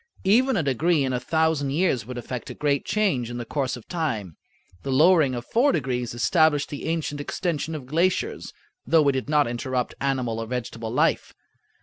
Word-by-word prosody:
Even 235 +5 +3
a 170 - +1
degree 150 +3 +2
in 130 -1 -1
a 125 - 0
thousand 160 +1 +1
years 140 -6 0
would 125 -1 -6
effect 120 0 -6
a - - -7
great 145 -2 0
change 150 - 0
in 120 - -5
the 120 - -5
course 135 -2 -2
of 120 - -14
time. 115 - -3 0.5
The 140 - -6
lowering 155 -1 +4
of 120 0 -5
four 260 +5 +3
degrees 125 -5 -2
established 150 +3 +2
the 145 - -6
ancient 160 -3 -2
extension 160 0 -3
of 145 -4 -7
glaciers, 170 +7 0 0.3
though 160 -3 +3
it - - +4
did 130 +1 -3
not 150 -3 +3
interrupt 125 +1 -2
animal 130 -5 -1
or 115 - -4
vegetable 115 -2 -4
life. 125 - +1
140 Hz, 190 wpm, -24 LUFS, 125-160 Hz, 0.5 s, lowering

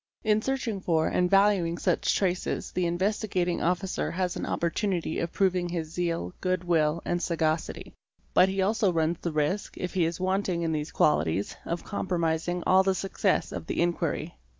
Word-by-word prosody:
In 215 -1 +3
searching 240 -6 -2
for 160 -3 +1
and 180 0 +1
valuing 195 -4 +3
such 180 -2 +1
traces 185 -2 -1
the 180 -1 0
Investigating 185 0 0
Officer 180 +2 0
has 180 0 -1
an - - -4
opportunity 170 -1 -1
of 170 - -2
prov 190 -2 +2
ing 175 -1 -1
his 165 -3 -4
zeal, 165 - -2
good 185 -1 0
will, 165 -2 +1
and 175 0 -1
sagacity, 160 -2 -1 0.4
but 185 - +6
he 190 0 0
also 210 0 +2
runs 165 0 0
the 170 - -2
risk, 155 +7 -1
if 180 - -4
he 180 -3 +2
is 165 +2 -3
wanting 185 -2 0
in 165 - 0
these 150 -1 -2
qualities, 95 - +1
of 170 0 -3
compromising 175 -3 -1
all 185 +1 +6
the 190 0 +1
success 195 +1 0
of - - -6
the - - -2
inquiry. 170 -1 -1
175 Hz, 175 wpm, -27 LUFS, 165-190 Hz, 0.4 s, but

